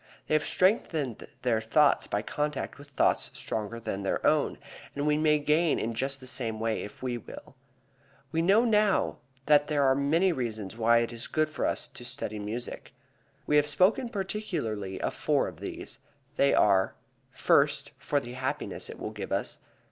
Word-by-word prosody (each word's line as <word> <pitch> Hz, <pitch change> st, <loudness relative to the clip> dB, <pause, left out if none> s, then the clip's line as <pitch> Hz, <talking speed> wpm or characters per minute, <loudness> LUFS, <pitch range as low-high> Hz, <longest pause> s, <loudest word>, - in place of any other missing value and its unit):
They -, -, -2 dB
have 155 Hz, -, +3 dB
strengthened 160 Hz, -, 0 dB, 0.2 s
their 115 Hz, -3 st, +2 dB
thoughts 145 Hz, +6 st, +3 dB
by 105 Hz, +1 st, -1 dB
contact 150 Hz, +3 st, -3 dB
with 145 Hz, -, -12 dB
thoughts 140 Hz, -, +1 dB
stronger 110 Hz, +2 st, -4 dB
than 100 Hz, -3 st, -4 dB
their 100 Hz, -, -1 dB
own, -, -, +2 dB, 0.4 s
and 145 Hz, +1 st, -2 dB
we 150 Hz, 0 st, +3 dB
may 155 Hz, 0 st, +3 dB
gain 150 Hz, +2 st, +2 dB
in 115 Hz, -, -2 dB
just 135 Hz, +4 st, -2 dB
the 130 Hz, -, -11 dB
same 115 Hz, -4 st, -3 dB
way 110 Hz, 0 st, -1 dB
if 105 Hz, -, -9 dB
we 125 Hz, -2 st, -2 dB
will. -, -, -11 dB, 0.8 s
We 165 Hz, -, +1 dB
know 200 Hz, +7 st, +4 dB
now 210 Hz, -3 st, +2 dB, 0.3 s
that 145 Hz, 0 st, +5 dB
there 145 Hz, -2 st, +1 dB
are 135 Hz, -1 st, +5 dB
many 155 Hz, +7 st, +2 dB
reasons 110 Hz, -, -4 dB
why 115 Hz, +1 st, +4 dB
it 115 Hz, -, -5 dB
is 115 Hz, 0 st, -4 dB
good 155 Hz, -1 st, 0 dB
for -, -, -1 dB
us -, -, 0 dB
to -, -, -9 dB
study 105 Hz, 0 st, -3 dB
music. 110 Hz, +4 st, -6 dB, 0.5 s
We 150 Hz, -, +3 dB
have 145 Hz, 0 st, +4 dB
spoken 185 Hz, -, +3 dB
particularly 175 Hz, -, -3 dB
of -, -, -2 dB
four -, -, +1 dB
of -, -, -9 dB
these. -, -, -6 dB, 0.4 s
They 140 Hz, -, +4 dB
are: 95 Hz, -2 st, +3 dB, 0.3 s
First, -, -, +2 dB
for 145 Hz, -, 0 dB
the 120 Hz, -3 st, -8 dB
happiness 130 Hz, +1 st, -3 dB
it -, -, -8 dB
will -, -, -4 dB
give -, -, -7 dB
us. -, -, -2 dB
140 Hz, 180 wpm, -29 LUFS, 115-155 Hz, 0.8 s, that